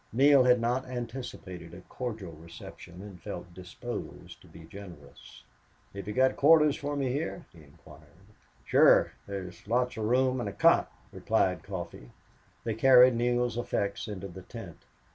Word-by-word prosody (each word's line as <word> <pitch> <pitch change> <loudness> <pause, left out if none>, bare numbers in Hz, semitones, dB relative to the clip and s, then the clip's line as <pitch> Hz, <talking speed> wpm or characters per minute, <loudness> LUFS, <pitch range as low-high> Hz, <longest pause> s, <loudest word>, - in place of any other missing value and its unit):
Neale 135 +2 +5
had 125 -1 +5
not 125 +3 -1
anticipated 115 -9 -7
a 90 - -11
cordial 110 -4 -6
reception 85 +2 -12
and 100 -4 -11
felt 90 0 -8
disposed 90 0 -8
to - - -18
be 85 - -14
generous. 90 -10 -13 0.5
"Have 100 -1 -8
you 105 - -3
got 130 0 +3
quarters 150 0 +5
for 145 0 -4
me 135 -3 -1
here?" 160 +5 -4
he 85 - -15
inquired. 75 +4 -18 0.4
"Sure. - - +5 0.2
There's 95 -2 -7
lots 125 +2 0
of 110 - -2
room 130 +2 +2
and 110 -4 -3
a - - -8
cot," 100 - +3 0.2
replied 90 -3 0
Coffee. 85 -10 -8 0.5
They 115 - -2
carried 125 +2 +7
Neale's 120 0 0
effects 100 -4 -2
inside 100 -3 -7
the 95 - -9
tent. 90 -5 -10
105 Hz, 155 wpm, -29 LUFS, 90-125 Hz, 0.5 s, carried